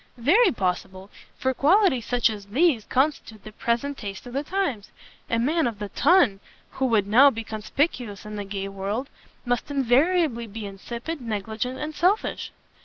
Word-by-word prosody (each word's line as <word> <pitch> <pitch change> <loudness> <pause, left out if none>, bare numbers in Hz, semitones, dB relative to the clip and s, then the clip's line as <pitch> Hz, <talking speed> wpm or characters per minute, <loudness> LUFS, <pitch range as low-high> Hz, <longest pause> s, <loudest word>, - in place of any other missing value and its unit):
"Very 360 - +4
possible, 190 -1 -3 0.3
for 260 0 0
qualities 300 - +3
such 245 -2 +2
as 205 -2 -8
these 255 0 +2
constitute 260 -6 -1
the 215 - -10
present 240 +6 -2
taste 200 0 -7
of 245 - -9
the 275 - 0
times. 300 - -2 0.4
A 230 - +1
man 295 +5 +1
of 230 -3 -4
the 205 -1 -5
Ton, 280 - +3 0.3
who 265 - -1
would 220 -5 +2
now 250 +8 +7
be 225 -4 -5
conspicuous 220 - -2
in 210 0 -7
the 205 - -4
gay 195 0 -5
world, 200 +7 -4 0.3
must 245 +3 -1
invariably 275 -1 +2
be 215 +1 -7
insipid, 235 +10 -6
negligent, 220 +3 -3
and 305 +2 -5
selfish." 365 +8 0
235 Hz, 165 wpm, -25 LUFS, 210-285 Hz, 0.4 s, now